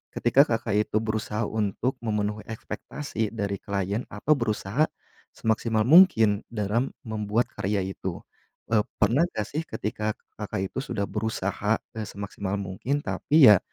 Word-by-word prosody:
ketika 135 +5 +5
Kakak 115 -2 0
itu - - -7
berusaha 110 0 -2
untuk 110 +5 -1
memenuhi 105 -1 -2
ekspektasi 110 +1 -4
dari 100 -2 -2
klien 100 +3 -2
atau 105 +9 -2
berusaha 115 +2 +1 0.5
semaksimal 110 0 +1
mungkin 120 - +6
dalam 115 +3 0 0.2
membuat 110 +1 -1
karya 100 0 -1
itu. 95 -2 -5 0.5
Eee, 110 - +5 0.2
pernah 120 - +3
gak 105 - 0
sih 150 - -1
ketika 105 0 -2 0.2
Kakak 95 -2 -3
itu - - -3
sudah 130 -7 -2
berusaha, 105 0 -1 0.2
eee, 110 -2 -5
semaksimal 100 -1 -4
mungkin, 100 +9 -2
tapi 145 -7 +6
ya 100 - +7
110 Hz, 135 wpm, -26 LUFS, 100-115 Hz, 0.5 s, ya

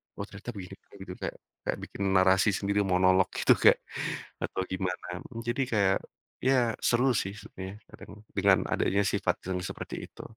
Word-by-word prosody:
"Oh 100 - -4
ternyata 100 +4 -8
begini." 95 0 -7 0.2
Begitu, 95 -2 -8
kayak - - -4 0.3
kayak - - +1
bikin 100 - -5
narasi 95 +2 +5
sendiri, 100 +1 0
monolog 95 0 +4
gitu, - - +3
kayak - - +5 0.6
atau - - -2
gimana. 90 -1 -3 0.2
Mmm, 115 -2 -6
jadi 120 +3 0
kayak, 100 -3 +3 0.5
ya 125 -3 +3
seru 125 +2 +3
sih 95 0 -1
sebetulnya, 95 0 -8
kadang 105 +1 -13
dengan 100 -1 +5
adanya 100 +1 +2
sifat 95 -3 +1
yang 95 -1 -1
seperti - - -6 0.2
itu. - - -11
100 Hz, 160 wpm, -29 LUFS, 95-105 Hz, 0.6 s, narasi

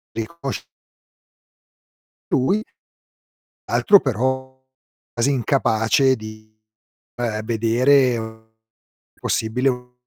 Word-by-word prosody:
Riconosc 135 +4 -5 1.7
Lui. 195 +12 +2 1.1
Altro 200 -2 +5
però 130 +1 -2 0.5
quasi 120 +4 +1
incapace 130 0 +2
di, 110 -1 -12 0.6
uhm, 115 -3 -2
vedere 115 -1 +1 0.6
possibile 125 +5 0
u 125 0 -7
125 Hz, 65 wpm, -21 LUFS, 110-130 Hz, 1.7 s, Altro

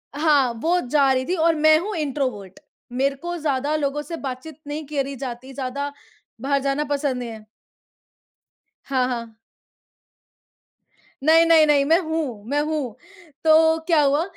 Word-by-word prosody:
हाँ, 290 -5 +3
वो 350 +2 +2
जा 275 0 +3
रही 260 0 -1
थी 360 - -1
और 330 -1 +2
मैं 310 0 +5
हूँ 405 +2 -4
इन्ट्रोवर्ट 255 - -3 0.3
मेरे 275 +3 0
को 345 +5 -5
ज़्यादा 290 -1 -1
लोगों 295 -1 -1
से 330 +3 -6
बातचीत 270 +4 -6
नहीं 300 +1 -5
करी 275 -2 -2
जाती, 260 0 -7
ज़्यादा 280 +2 -4 0.5
बाहर 280 +1 +1
जाना 275 +2 0
पसंद 280 -3 -1
नहीं 245 -2 -5
है। 220 -1 -10 1.4
हाँ, 260 -2 0
हाँ। 235 -3 -5 1.9
नहीं, 325 +2 +6
नहीं, 325 -2 +6
नहीं। 285 -2 +4
मैं 320 +3 +4
हूँ, 310 -10 -3
मैं 290 +1 +1
हूँ। 295 -7 -3 0.5
तो 320 0 +5
क्या 325 -3 +4
हुआ 290 +3 +2
285 Hz, 150 wpm, -22 LUFS, 260-315 Hz, 1.9 s, नहीं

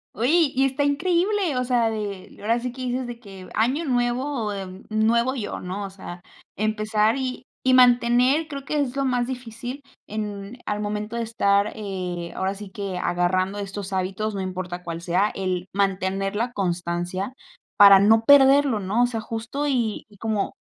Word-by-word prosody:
¡Oye 290 +6 +3
y 270 +1 +3
está 270 +2 0
increíble! 345 +3 +1
O 250 - +1
sea 240 -2 +2
de 205 -4 -5
ahora 230 +3 +1
sí 250 +1 -4
que 255 +1 -8
dices 250 0 -2
de 240 -1 -7
que 195 -5 -12
año 255 +9 +1
nuevo, 245 -3 -1
em, 190 -1 -7
nuevo 230 +3 +2
yo, 235 -6 -4
¿no? 190 +3 -5
O - - -6
sea 190 -2 -9 0.3
empezar 215 +2 +1
y 255 -1 -4 0.2
y 255 - +4
mantener 250 +4 +4
creo 280 -3 -6
que 300 +2 -2
es 265 -2 -1
lo 275 0 0
más 245 -1 +1
difícil 245 +1 -6 0.2
en 210 +1 -6
al 210 0 -1
momento 210 +2 -3
de 235 - -1
estar, 200 -2 +2
eh, 185 -5 -4
ahora 190 +1 -1
sí 205 0 -9
que 195 -1 -5
agarrando 185 +3 0
estos 200 -1 -5
hábitos, 195 +3 -2
no 195 - -2
importa 185 -1 -5
cuál 170 -1 -5
sea, 185 +4 +1
el 185 -2 -2
mantener 195 0 0
la 235 +3 -1
constancia 175 +2 -2 0.4
para 200 -2 +9
no 220 +3 +5
perderlo, 275 -3 +6
¿no? 200 +5 +1
O - - +4
sea 235 -2 -3
justo 230 +6 -4
y 235 -6 -1
y 205 - -19
como 215 -1 -2
215 Hz, 175 wpm, -24 LUFS, 195-250 Hz, 0.4 s, para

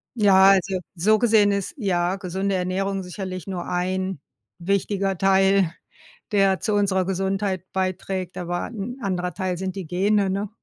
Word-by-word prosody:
Ja, 195 -4 +5
also 190 -1 +1 0.2
so 215 +6 +3
gesehen 215 -3 +4
ist, 200 -1 -2
ja, 180 -5 0
gesunde 195 0 -2
Ernährung 190 +2 -1
sicherlich 185 -1 -6
nur 185 -2 -4
ein 185 0 -2 0.4
wichtiger 195 +1 0
Teil, 195 -2 +3 0.6
der 195 -2 +3
zu 215 - 0
unserer 195 -2 +2
Gesundheit 190 0 -1
beiträgt, 185 -1 -3
aber 175 0 -3
'n 235 +2 -6
anderer 180 -3 -2
Teil 185 -1 -2
sind 185 0 -4
die 190 -5 -6
Gene, 195 +3 +1
ne? 195 +2 -2
190 Hz, 145 wpm, -23 LUFS, 185-200 Hz, 0.6 s, Ja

